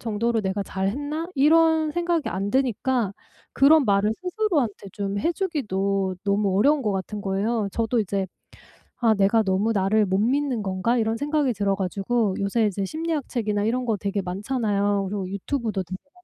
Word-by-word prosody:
정도로 225 +1 0
내가 195 0 -2
잘했나?' 290 - -3
이런 315 +1 +4
생각이 345 -2 0
안 195 +2 -2
드니까 250 -3 0 0.4
그런 290 +1 +5
말을 205 +1 +2
스스로한테 355 - -1
좀 200 0 -3
해 335 - +1
주기도 200 - -1
너무 200 -1 +1
어려운 290 +5 +3
것 210 - 0
같은 195 +2 -3
거예요. 200 +2 -1
저도 230 +3 0
이제 195 -1 -1 0.7
'아 225 -3 +3
내가 200 +3 +3
너무 195 +3 +1
나를 205 +2 +2
못 190 0 0
믿는 255 0 +1
건가?' 190 +6 0
이런 225 0 0
생각이 290 -1 0
들어 200 -2 0
가지고 195 +2 0
요새 215 +3 +1
이제 200 -1 -2
심리학 315 - -3
책이나 210 -4 -1
이런 245 +4 0
거 220 -2 +1
되게 200 +1 -2
많잖아요. 200 0 -1
그리고 195 -2 -3
유튜브도 210 -1 -2
되게 185 +2 -6
많고. 280 - -36
215 Hz, 360 characters per minute, -24 LUFS, 195-270 Hz, 0.7 s, 그런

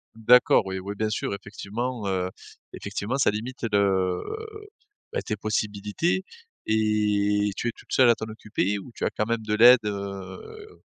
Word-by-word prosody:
D'accord. 115 -1 +5
Oui, 95 0 -3
oui, 100 +2 -5
bien 110 +1 -1
sûr. 105 - -2
Effectivement, 105 +3 -5
heu, 90 -1 -1 0.4
effectivement, 115 +7 -3
ça 135 - +3
limite 120 +4 -5
le, 95 -3 +2 0.9
bah, - - -2
tes 105 - -2
possibilités 105 - -1 0.4
et 105 -1 +2
tu - - -2
es 120 - +1
toute - - -18
seule 130 -2 +5
à 115 - +6
t'en 110 - -5
occuper 105 -2 -2
ou 100 - -11
tu - - -3
as - - +2
quand 105 - -2
même 115 0 -1
de 105 0 -1
l'aide 120 +3 +8
heu? 100 - -7
105 Hz, 165 wpm, -25 LUFS, 100-115 Hz, 0.9 s, l'aide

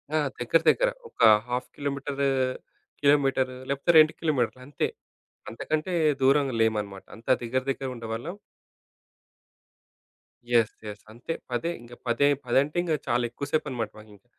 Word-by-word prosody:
ఆ! - - +4 0.2
దగ్గర 120 +7 +3
దగ్గర. - - +3 0.2
ఒక - - -11 0.3
హాఫ్ 125 +1 -2
కిలోమీటరు, 140 0 -2 0.7
కిలోమీటరు, 135 -3 +3
లేకపోతే 140 +5 +2
2 155 0 +6
కిలోమీటర్లు 130 -6 0
అంతే. 145 - -1 0.6
అంతకంటే 155 +9 -3 0.3
దూరంగా 135 -1 +3
లేమనమాట. 105 -3 -1
అంతా 115 +4 -3
దగ్గర 125 +3 0
దగ్గరుండేవాళ్ళం. 125 - -5 2.2
Yes, 115 -2 +4
yes. 105 0 -8
అంతే 120 +8 -5 0.2
పదే, 165 +8 -1
ఇంక 120 0 -13
పదె 120 +4 +3 0.2
పదంటే 140 +6 +1
ఇంక 170 -3 0
చాలా 120 0 +1
ఎక్కువ 140 - -5
సేపనమాట, 120 -8 -1
మాకింక. 105 -1 -17
130 Hz, 120 wpm, -26 LUFS, 115-145 Hz, 2.2 s, 2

